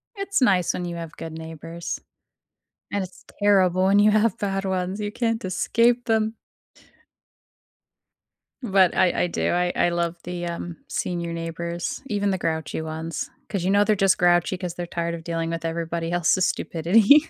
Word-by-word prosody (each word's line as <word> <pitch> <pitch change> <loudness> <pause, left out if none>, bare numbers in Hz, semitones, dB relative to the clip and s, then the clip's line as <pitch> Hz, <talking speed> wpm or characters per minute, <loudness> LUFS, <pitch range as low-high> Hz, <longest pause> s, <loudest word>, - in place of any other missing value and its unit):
It's 395 -4 -1
nice 190 -8 +3
when 180 - -3
you 175 -1 -4
have 165 -2 -6
good 160 - -6
neighbors. 160 +1 -6 0.9
And 200 -1 0
it's 185 0 -11 0.2
terrible 190 -3 +4
when 200 +1 +5
you 210 +1 +6
have 215 -1 +3
bad 195 -1 -1
ones, 190 +1 -2
you 205 -1 -2
can't 230 0 -1
escape 230 +6 +2
them. 220 0 +1 2.3
But, 190 -5 +4
I 180 - +3
I - - +1
do, 170 - -1
I 175 0 +1
I - - +3
love 170 0 -1
the, 175 0 -4
um, 170 0 -5
senior 170 -1 -2
neighbors, 170 +1 -4
even 205 -4 0
the 190 - 0
grouchy 160 -2 -2
ones, 160 +1 -4 0.2
'cause, 195 -4 -2
you 185 - +1
know, 200 +1 +5
they're 215 0 +3
just 195 -1 +3
grouchy 175 +1 +3
'cause 180 -2 -4
they're 175 0 -5
tired 170 0 -2
of 165 -1 -6
dealing 165 -1 -2
with 165 0 -4
everybody 165 0 -2
else's 175 +1 +3
stupidity. 215 - +4
180 Hz, 170 wpm, -24 LUFS, 170-205 Hz, 2.3 s, you